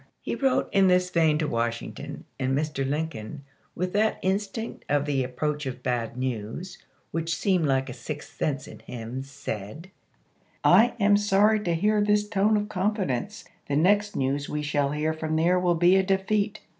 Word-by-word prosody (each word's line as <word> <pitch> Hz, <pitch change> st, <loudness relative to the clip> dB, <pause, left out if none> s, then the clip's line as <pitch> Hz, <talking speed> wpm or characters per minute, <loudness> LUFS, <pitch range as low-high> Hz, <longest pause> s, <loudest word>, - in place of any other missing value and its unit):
He -, -, -4 dB
wrote 270 Hz, -2 st, +1 dB
in 195 Hz, -1 st, +4 dB
this 180 Hz, 0 st, +3 dB
vein 160 Hz, -3 st, +3 dB
to 155 Hz, -1 st, -1 dB
Washington, 115 Hz, -1 st, -3 dB
and 135 Hz, 0 st, +1 dB
Mr. 150 Hz, -2 st, -1 dB
Lincoln, 145 Hz, -4 st, -4 dB, 0.3 s
with 180 Hz, +1 st, -2 dB
that 215 Hz, +2 st, +2 dB
instinct 200 Hz, +4 st, -2 dB
of 145 Hz, 0 st, +2 dB
the 140 Hz, -3 st, 0 dB
approach 145 Hz, +3 st, -2 dB
of 130 Hz, -1 st, -6 dB
bad 120 Hz, -1 st, -2 dB
news 130 Hz, -, -4 dB, 0.3 s
which 165 Hz, 0 st, -1 dB
seemed 185 Hz, -6 st, +1 dB
like 135 Hz, -1 st, +1 dB
a 125 Hz, -, -6 dB
sixth 145 Hz, +4 st, -8 dB
sense 140 Hz, -3 st, -2 dB
in -, -, -11 dB
him, 120 Hz, +2 st, -6 dB
said, 135 Hz, -, -7 dB, 0.7 s
"I 240 Hz, +2 st, +6 dB
am 205 Hz, 0 st, +5 dB
sorry 205 Hz, +1 st, +3 dB
to 175 Hz, -5 st, -1 dB
see 210 Hz, +3 st, +3 dB
this 210 Hz, 0 st, +2 dB
tone 210 Hz, +1 st, +2 dB
of 205 Hz, -, 0 dB
confi 205 Hz, -2 st, -1 dB
dence; 195 Hz, -, -3 dB, 0.2 s
the 140 Hz, -, -1 dB
next 205 Hz, +6 st, +3 dB
news 140 Hz, +2 st, -1 dB
we 150 Hz, 0 st, -2 dB
shall 145 Hz, -1 st, +1 dB
hear 150 Hz, +2 st, -1 dB
from 155 Hz, 0 st, -3 dB
there 160 Hz, +2 st, +3 dB
Diary -, -, -4 dB
will 175 Hz, -1 st, +3 dB
be 175 Hz, +3 st, +5 dB
of 190 Hz, -, +2 dB
a -, -, -14 dB
defeat." 200 Hz, +2 st, 0 dB
160 Hz, 185 wpm, -26 LUFS, 135-195 Hz, 0.7 s, I